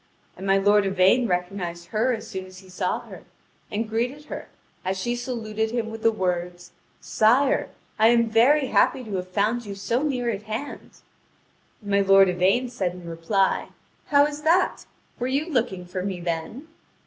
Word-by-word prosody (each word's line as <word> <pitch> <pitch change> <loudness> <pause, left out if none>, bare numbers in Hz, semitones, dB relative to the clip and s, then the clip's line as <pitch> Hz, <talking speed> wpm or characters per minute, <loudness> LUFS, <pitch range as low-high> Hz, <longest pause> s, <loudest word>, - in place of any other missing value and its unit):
And 195 - -7
my 195 0 +4
lord 205 +1 +4
Yvain 195 +6 +3
recognised 180 -2 -3
her 230 +4 +1
as 225 -3 -4
soon 190 0 -6
as 185 0 -14
he 190 0 -14
saw 185 0 -2
her, - - -12 0.5
and 215 +2 -2
greeted 245 +7 -2
her, - - -7 0.3
as 190 +1 -2
she 240 +6 -2
saluted 225 -3 -3
him 230 -1 -3
with 225 0 -8
the 225 - +4
words: 180 -3 -3 0.3
"Sire, 250 +6 +2 0.3
I 220 - +6
am 235 0 +4
very 260 +6 +4
happy 255 - +2
to 210 -4 -5
have 180 0 -4
found 210 +6 0
you 200 - -5
so 230 +5 -1
near 250 -5 -1
at 200 -2 -4
hand." 235 +7 -6 0.8
And 205 - -6
my 200 0 +4
lord 195 -1 +6
Yvain 190 +8 +2
said 190 -7 -2
in 180 -1 -10
reply: 170 +4 0 0.4
"How 285 -1 +5
is 295 0 -5
that? 335 +4 +2 0.3
Were 245 - -1
you 275 +4 0
looking 230 - -1
for 180 +1 -5
me, 190 -1 -3
then?" 170 - -4
215 Hz, 180 wpm, -24 LUFS, 185-245 Hz, 0.8 s, I